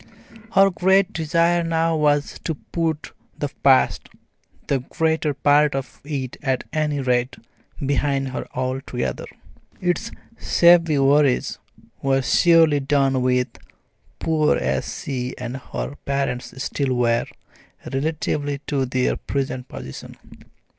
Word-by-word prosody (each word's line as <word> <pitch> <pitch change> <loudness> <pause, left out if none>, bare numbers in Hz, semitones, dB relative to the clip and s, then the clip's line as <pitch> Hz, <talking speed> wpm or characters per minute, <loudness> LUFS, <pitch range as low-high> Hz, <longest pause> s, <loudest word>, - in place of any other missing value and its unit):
Her 195 0 +5
great 190 +2 +3
desire 170 +2 +2
now 165 0 +1
was 145 -1 +1
to 160 - -1
put 160 0 -3 0.3
the 145 - -2
past 135 -1 +3 0.6
the 140 - 0
greater 160 +2 -1
part 145 +1 +3
of 135 -1 -6
it 140 -3 -4
at 135 -3 -1
any 150 -2 0
rate 125 -1 0 0.5
behind 140 0 0
her 130 - -5
altogether. 130 - -3 0.5
Its 180 +6 -1 0.3
shabby 170 -3 +5
worries 140 -1 +3 0.4
were 135 -1 +1
surely 165 +2 +4
done 135 -2 +1
with, 125 0 +1 0.7
poor 155 -2 +2
as 65 -1 -2
she 130 -2 -3
and 125 0 -5
her 135 +1 -5
parents 140 -2 -2
still 135 -3 -1
were, 120 -1 +1 0.7
relatively 145 0 -1
to 135 -2 -1
their 125 0 0
present 135 -2 -3
position. 65 - -9
140 Hz, 115 wpm, -22 LUFS, 130-160 Hz, 0.7 s, Her